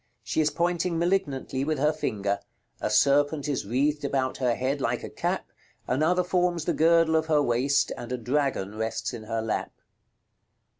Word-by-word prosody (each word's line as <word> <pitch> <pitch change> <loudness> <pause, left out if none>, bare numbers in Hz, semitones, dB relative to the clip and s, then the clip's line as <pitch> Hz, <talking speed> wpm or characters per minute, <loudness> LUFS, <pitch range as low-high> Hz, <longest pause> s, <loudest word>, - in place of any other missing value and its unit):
She 110 +9 0
is 155 - +3
pointing 170 +2 0
malignantly 165 -7 0
with 155 +1 -1
her 150 +3 +2
finger; 100 -9 -2 0.4
a - - -1
serpent 145 +6 +3
is 140 -8 -2
wreathed 145 +6 +1
about 135 -2 -1
her 125 -3 +1
head 135 +3 -1
like - - -1
a - - -7
cap, - - -2 0.4
another 160 +8 +2
forms 175 -2 0
the 170 - +1
girdle 165 0 +4
of 160 0 +1
her 150 -2 +3
waist, 130 +3 +2
and 120 - -8
a 125 - -1
dragon 125 -5 -1
rests 110 +3 -2
in 110 -2 -7
her 115 0 -2
lap. 110 - -2
145 Hz, 170 wpm, -27 LUFS, 125-160 Hz, 0.4 s, girdle